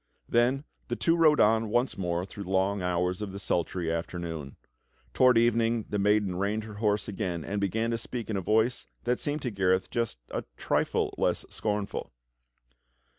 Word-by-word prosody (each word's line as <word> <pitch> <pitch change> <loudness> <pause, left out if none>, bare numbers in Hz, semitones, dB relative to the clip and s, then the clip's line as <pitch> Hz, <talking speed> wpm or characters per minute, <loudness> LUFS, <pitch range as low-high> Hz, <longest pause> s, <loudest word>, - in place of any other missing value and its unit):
Then 125 +4 +2 0.2
the - - -1
two 165 - +2
rode 155 -3 +5
on 110 +1 +4
once 120 +4 +1
more 90 -1 -1
through 100 +1 -8
the - - -8
long 95 +1 +1
hours 90 +1 0
of 105 -2 -4
the 100 - -6
sultry 90 -3 -1
afternoon. 85 -4 -4 0.6
Toward 125 -2 +5
evening 115 -1 +2
the 105 - 0
maiden 100 -2 +2
reined 105 +3 0
her 110 0 -8
horse 105 -2 +1
again 90 -5 -3
and 100 0 -2
began 110 +4 0
to 115 - -1
speak 115 0 -5
in 110 - -2
a 95 - 0
voice 110 +6 +1 0.2
that 125 0 0
seemed 145 0 -2
to 125 - -1
Gareth 95 -2 +1
just 115 - -1
a - - -2
trifle - - 0
less - - +1
scornful. 105 -1 -2
105 Hz, 180 wpm, -28 LUFS, 95-115 Hz, 0.6 s, rode